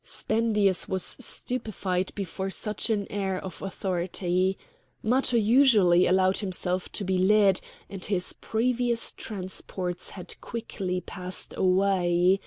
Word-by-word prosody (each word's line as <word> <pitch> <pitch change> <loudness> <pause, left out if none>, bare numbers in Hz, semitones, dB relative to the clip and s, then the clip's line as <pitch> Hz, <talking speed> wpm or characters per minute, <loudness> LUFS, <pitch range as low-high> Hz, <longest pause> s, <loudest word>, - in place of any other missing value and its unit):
Spendius 210 -4 +1
was 190 -1 +1 0.2
stupefied 200 -8 -1
before 195 0 -4
such 210 +4 0
an 205 -3 0
air 195 -2 -1
of 185 -1 -8
authority. 185 -1 -1 0.5
Matho 250 +2 +2
usually 215 -6 +5
allowed 185 +1 +3
himself 185 -2 -2
to - - -2
be 190 -1 0
led, 195 0 +4 0.3
and 195 -2 -7
his 185 -3 -1
previous 240 +1 0
transports 185 -2 -5
had 180 - -9
quickly 195 -6 -4
passed 185 0 -4
away. 185 -1 +3
190 Hz, 115 wpm, -27 LUFS, 185-215 Hz, 0.5 s, usually